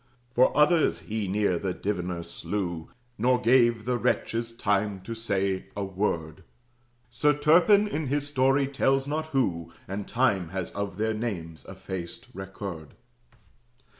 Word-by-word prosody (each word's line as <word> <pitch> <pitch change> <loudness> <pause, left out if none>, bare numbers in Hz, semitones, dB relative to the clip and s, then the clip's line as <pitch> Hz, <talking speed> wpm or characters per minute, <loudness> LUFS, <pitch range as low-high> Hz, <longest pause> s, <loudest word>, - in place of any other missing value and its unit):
Four 125 +1 +4
others 155 +2 +4
he 110 -2 -3
near 95 -2 +1
that 95 -2 -4
Diviner 90 -4 -2
slew, 85 -4 -4 0.3
Nor 125 +2 +3
gave 120 -2 +3
the 125 -1 0
wretches 115 0 0
time 105 -3 0
to 115 +5 -6
say 100 -4 -1
a 100 - -2
word. 90 -5 -2 0.7
Sir 150 +4 +3
Turpin 180 +8 +5
in 155 -7 -3
his 145 +2 0
story 135 0 +2
tells 135 0 +1
not 155 +2 -2
who, 95 - -1 0.2
And 100 +1 -5
Time 105 -9 +1
has 95 -1 -4
of 100 -2 -4
their 110 +1 0
names 90 -8 -5
effaced 90 -3 -7
record. 95 -4 -7
105 Hz, 135 wpm, -27 LUFS, 95-130 Hz, 0.7 s, Turpin